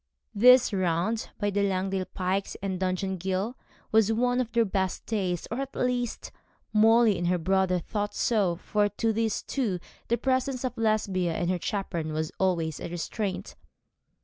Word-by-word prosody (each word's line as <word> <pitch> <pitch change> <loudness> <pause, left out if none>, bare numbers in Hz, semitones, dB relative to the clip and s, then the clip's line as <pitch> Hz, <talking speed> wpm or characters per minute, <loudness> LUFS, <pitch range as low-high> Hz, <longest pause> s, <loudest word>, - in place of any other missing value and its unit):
This 250 +2 +6
round 185 +4 0
by 205 -1 0
the 205 +1 +1
Langdale 190 -1 0
Pikes 190 +1 -2
and 190 -2 -2
Dungeon 190 +1 -1
Ghyll 190 +6 -1 0.4
was 220 -1 +4
one 245 +2 +2
of 235 -2 -4
their 235 -1 +3
best 190 -2 -2
days; 185 -6 -2
or, 235 - -2
at 275 0 -5
least, 245 -2 -1 0.4
Molly 220 -1 +5
and 175 - -1
her 180 0 +2
brother 190 +1 +2
thought 205 +4 -3
so; 200 -7 +2
for 205 +4 0
to 225 +2 0
those 220 -1 -1
two 220 -10 -1 0.3
the 235 - +1
presence 260 0 0
of 255 -1 -2
Lesbia 205 -6 0
and 175 +1 0
her 180 - -1
chaperon 170 -6 -3
was 155 0 -2
always 170 -5 0
a - - -5
restraint. 185 +4 -4
200 Hz, 165 wpm, -27 LUFS, 185-225 Hz, 0.4 s, This